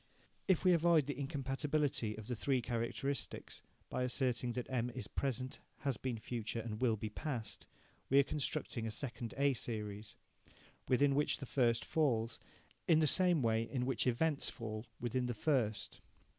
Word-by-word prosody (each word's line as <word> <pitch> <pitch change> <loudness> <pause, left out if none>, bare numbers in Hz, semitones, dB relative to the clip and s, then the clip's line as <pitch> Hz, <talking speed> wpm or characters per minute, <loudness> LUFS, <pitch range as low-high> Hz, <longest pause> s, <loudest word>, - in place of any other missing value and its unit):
If 190 -4 +3
we 185 -1 +6
avoid 165 -3 +4
the 145 -1 -3
incompatibility 140 -3 0
of 110 - -7
the 125 - -2
three 130 +3 +1
characteristics 120 +4 -3 0.3
by - - -2
asserting 125 -1 0
that 125 0 -2
M 125 -2 0
is 125 +1 -5
present, 130 -1 -2 0.2
has 135 -5 0
been 125 0 -2
future, 115 0 -3
and 110 0 -5
will 120 -4 +3
be 110 +1 -4
past, 120 -3 -4 0.4
we 135 - +5
are 140 - +8
constructing 130 -5 -2
a - - -1
second 115 0 -4
A 140 0 +4
series, 105 -3 -4 0.7
within 140 +2 +4
which 145 +2 +2
the 135 - -6
first 120 -3 +2
falls, 125 -9 +1 0.5
in 165 - +6
the 155 - +4
same 175 -1 +4
way 110 -1 +3
in 125 +2 -2
which 130 -1 0
events 145 +4 +2
fall 110 -1 -6
within 125 +1 -1
the 120 - -2
first. 110 -6 0
125 Hz, 165 wpm, -36 LUFS, 115-140 Hz, 0.7 s, are